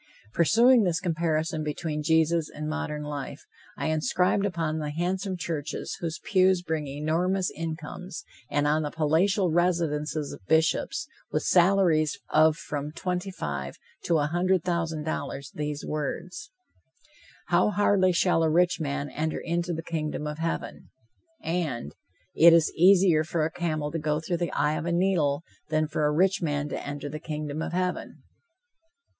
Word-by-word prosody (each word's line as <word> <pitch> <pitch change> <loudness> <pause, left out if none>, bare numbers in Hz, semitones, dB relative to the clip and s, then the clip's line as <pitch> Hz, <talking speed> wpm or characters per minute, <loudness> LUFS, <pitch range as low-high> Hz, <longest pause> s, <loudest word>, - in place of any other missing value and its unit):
Pursuing 235 +8 +5
this 175 -4 +1
comparison 160 -2 -1
between 150 0 -3
Jesus 160 +1 +2
and 150 0 -6
modern 155 -1 -3
life, 145 -2 -6 0.3
I - - -1
inscribed 180 +5 +1
upon 165 -4 -2
the 150 -1 -3
handsome 185 +4 -2
churches 160 -3 -4
whose 170 -1 -3
pews 185 -2 +3
bring 160 -3 -2
enormous 165 +7 0
incomes, 165 +2 -6 0.3
and 145 0 +1
on 150 +1 +2
the 150 - -2
palatial 170 +5 +2
residences 155 -4 0
of - - -12
Bishops, 160 0 +1 0.2
with - - 0
salaries 175 -3 +3
of 155 0 +5
from 145 -1 -5
twenty 180 +3 -3
five 70 - -5 0.3
to 170 - +3
a 145 - +1
hundred 175 +3 +1
thousand 165 -3 -1
dollars, 140 -3 -4
these 150 -1 -4
words: 155 - -4 1.0
"How 175 +3 +4
hardly 205 -3 +3
shall 175 -1 +2
a 160 - +3
rich 175 +3 +3
man 145 -2 -2
enter 155 +1 -2
into 170 +1 -2
the 165 -1 -4
kingdom 155 -3 -3
of 150 +1 -5
Heaven," 165 0 -4 0.5
and, 155 - -2 0.4
"It 170 +1 +7
is 165 -2 +4
easier 180 -3 +5
for 160 -1 -1
a 160 - -2
camel 155 -4 -2
to 165 - -2
go 150 0 0
through 170 +2 -2
the 175 0 -2
eye 150 0 +1
of 170 - -5
a - - 0
needle 170 -5 +1 0.3
than 155 0 +1
for 150 0 0
a - - +1
rich 185 +5 +2
man 145 -2 -1
to - - -4
enter 145 0 -5
the 155 +2 -6
kingdom 155 -1 -4
of - - -4
Heaven." 180 0 -3
160 Hz, 160 wpm, -27 LUFS, 150-175 Hz, 1.0 s, It